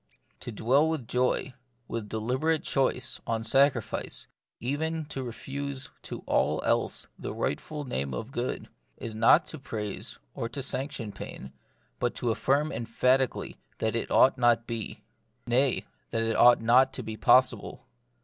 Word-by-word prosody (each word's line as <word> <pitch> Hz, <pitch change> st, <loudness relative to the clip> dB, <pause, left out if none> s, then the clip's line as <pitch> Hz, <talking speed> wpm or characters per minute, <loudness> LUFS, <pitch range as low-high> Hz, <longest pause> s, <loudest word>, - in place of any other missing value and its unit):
To -, -, -6 dB
dwell 130 Hz, +8 st, +3 dB
with 155 Hz, -8 st, -3 dB
joy, 125 Hz, +1 st, 0 dB, 0.3 s
with 110 Hz, -3 st, -4 dB
deliberate 130 Hz, +9 st, 0 dB
choice, 130 Hz, -2 st, +1 dB
on 115 Hz, -1 st, -1 dB
sacrifice, 135 Hz, +5 st, +1 dB, 0.3 s
even 155 Hz, +5 st, -2 dB
to 135 Hz, -2 st, -5 dB
refuse 135 Hz, +2 st, -5 dB
to -, -, -6 dB
all -, -, +2 dB
else -, -, 0 dB
the -, -, -4 dB
right -, -, -1 dB
ful 150 Hz, -2 st, -6 dB
name 70 Hz, -, -2 dB
of 115 Hz, -, -5 dB
good, 125 Hz, 0 st, -3 dB, 0.3 s
is 115 Hz, -, -5 dB
not 115 Hz, +9 st, +5 dB
to 160 Hz, -, -7 dB
praise 105 Hz, -6 st, -5 dB, 0.2 s
or 115 Hz, -, -3 dB
to 130 Hz, +3 st, -5 dB
sanc 135 Hz, +2 st, -2 dB
tion 115 Hz, -6 st, -5 dB
pain, 65 Hz, -8 st, -8 dB, 0.5 s
but -, -, 0 dB
to 120 Hz, -, 0 dB
affirm 140 Hz, +6 st, +1 dB
emphatically 125 Hz, +3 st, +1 dB, 0.2 s
that 110 Hz, 0 st, -1 dB
it 115 Hz, -, -1 dB
ought 130 Hz, 0 st, +5 dB
not 120 Hz, -1 st, +4 dB
to -, -, -30 dB
be; 115 Hz, -2 st, -5 dB, 0.4 s
nay, 130 Hz, +2 st, +2 dB, 0.2 s
that 115 Hz, -, 0 dB
it 115 Hz, 0 st, 0 dB
ought 120 Hz, -1 st, +7 dB
not 130 Hz, +3 st, +5 dB
to 125 Hz, -, -5 dB
be 110 Hz, 0 st, -5 dB
possible. -, -, +3 dB
125 Hz, 160 wpm, -28 LUFS, 115-135 Hz, 0.5 s, ought